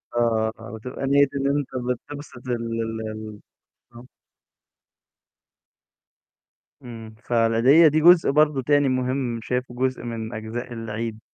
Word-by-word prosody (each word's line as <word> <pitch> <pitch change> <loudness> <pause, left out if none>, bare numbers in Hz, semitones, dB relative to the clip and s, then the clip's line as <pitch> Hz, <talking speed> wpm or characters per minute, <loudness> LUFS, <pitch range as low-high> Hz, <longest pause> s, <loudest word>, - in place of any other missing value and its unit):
آه، 110 -2 +1 0.2
بتبقى 125 +4 -6
نيّة 140 0 +4
إن 140 0 0
أنت 145 - -3 0.3
بتبسط 145 -4 -11
ال - - -2
ال 115 -1 -3
ال 110 -1 -8 0.6
آه. 120 +1 -12 2.8
إمم، 115 -2 -10
فالعيديّة 120 +7 +4
دي 155 +1 +2
جزء 175 +1 +6
برضه 150 -2 +3
تاني 145 +1 +2
مهم 130 -2 -1
شايفه 125 +1 -3
جزء 130 -1 -1
من 115 -1 -5
أجزاء 110 +3 -6
العيد. 115 0 -5
120 Hz, 115 wpm, -23 LUFS, 115-135 Hz, 2.8 s, جزء